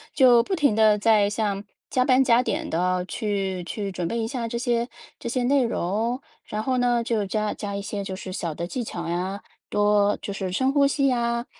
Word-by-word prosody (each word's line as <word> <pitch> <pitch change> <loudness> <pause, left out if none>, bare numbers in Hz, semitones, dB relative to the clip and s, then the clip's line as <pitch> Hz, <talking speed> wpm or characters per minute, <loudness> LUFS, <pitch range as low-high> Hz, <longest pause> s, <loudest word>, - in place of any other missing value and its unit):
就 245 -3 +7
不 370 +11 -2
停 285 -9 +2
地 215 -1 +5
在 210 -1 +4
像 205 -2 -1 0.3
加 255 - +3
班 260 +1 +4
加 240 -1 +4
点 - - -2
地 180 +2 0
去 195 -5 -2
去 200 +2 -4
准 180 -2 -3
备 230 - -2
一 225 - -1
下 235 -2 -3
这 235 - -3
些 240 -1 0 0.3
这 235 - -4
些 250 0 0
内 270 +1 +3
容。 230 +3 -1 0.3
然 215 +1 -4
后 255 +1 0
呢， 240 -1 +2
就 220 -3 -1
加 215 +1 -1
加 200 -1 -5
一 200 - -3
些 200 0 -4
就 190 -1 -5
是 185 -1 -7
小 165 -4 -3
的 170 - -3
技 240 +7 -4
巧 170 -5 -5
呀， 185 +4 -2 0.3
多 205 0 +3
就 200 - -5
是 190 -2 -3
深 260 +8 +1
呼 280 -1 +4
吸 275 0 +1
呀。 235 -1 0
220 Hz, 235 characters per minute, -24 LUFS, 195-245 Hz, 0.3 s, 就